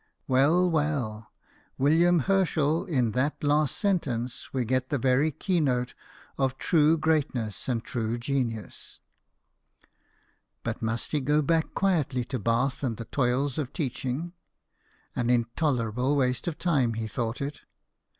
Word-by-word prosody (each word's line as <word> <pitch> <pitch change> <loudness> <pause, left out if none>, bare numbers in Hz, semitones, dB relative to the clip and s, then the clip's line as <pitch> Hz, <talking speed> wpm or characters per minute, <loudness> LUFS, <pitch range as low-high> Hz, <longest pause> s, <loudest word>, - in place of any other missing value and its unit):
Well, 150 +8 +4
well, 145 -10 -1 0.5
William 165 +4 +4
Herschel, 160 -3 +1
in 125 -9 +1
that 130 +7 -1
last 150 0 +2
sentence 130 - -1
we 130 -2 -1
get 130 +2 0
the 145 - 0
very 130 +4 +2
keynote 140 -7 0 0.5
of 135 -1 0
true 160 -1 +3
greatness 140 -9 -1
and 115 -3 -1
true 115 -1 -2
genius. 120 -3 -4 1.6
But - - -3
must 115 +1 -2
he 150 - +1
go 150 +3 +2
back 165 +1 0
quietly 150 -10 +1
to 130 - 0
Bath 120 +5 0
and 120 -6 -2
the 115 - -6
toils 130 +3 0
of 140 -3 -4
teaching? 145 +2 -3 0.8
"An 120 -1 0
intolerable 125 +1 +1
waste 130 0 0
of 160 -3 -2
time," 140 -10 +1
he 110 0 -3
thought 115 +1 -3
it. 140 +1 -5
135 Hz, 130 wpm, -27 LUFS, 120-155 Hz, 1.6 s, Well